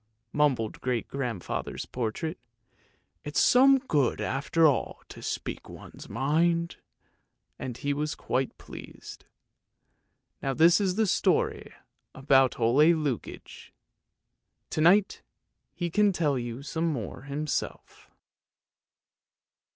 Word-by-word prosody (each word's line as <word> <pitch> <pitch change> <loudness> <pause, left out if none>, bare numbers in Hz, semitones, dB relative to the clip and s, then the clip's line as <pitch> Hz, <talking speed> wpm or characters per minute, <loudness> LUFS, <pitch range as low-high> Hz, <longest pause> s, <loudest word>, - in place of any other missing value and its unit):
" - - -50
mumbled 135 -7 0
great 125 -3 -1
grandfather's 125 -9 -4
portrait. 130 +8 -4 0.4
" - - -41
It's 150 -1 -1
some 270 +2 +6
good 150 - 0
after 155 +5 +1
all 145 -5 +1
to - - -11
speak - - -5
one's - - -12
mind! 165 +6 0 0.4
" - - -50
and 125 -2 -5
he 145 +3 -1
was 150 +1 -2
quite 130 0 -2
pleased. - - -11 1.2
Now 135 -1 -2
this 170 +6 +5
is 185 -2 0
the 220 +1 +2
story 190 - 0 0.4
about 135 -1 +3
Ole 120 +6 +4
Lukoie! 145 -6 -5 1.0
To 155 - -1
night 190 +5 +4 0.5
he 175 -2 -4
can 210 +2 +3
tell 155 -6 0
you 120 +1 -5
some 160 +4 -2
more 120 - -5
himself. 145 0 -4
145 Hz, 115 wpm, -27 LUFS, 130-170 Hz, 1.2 s, some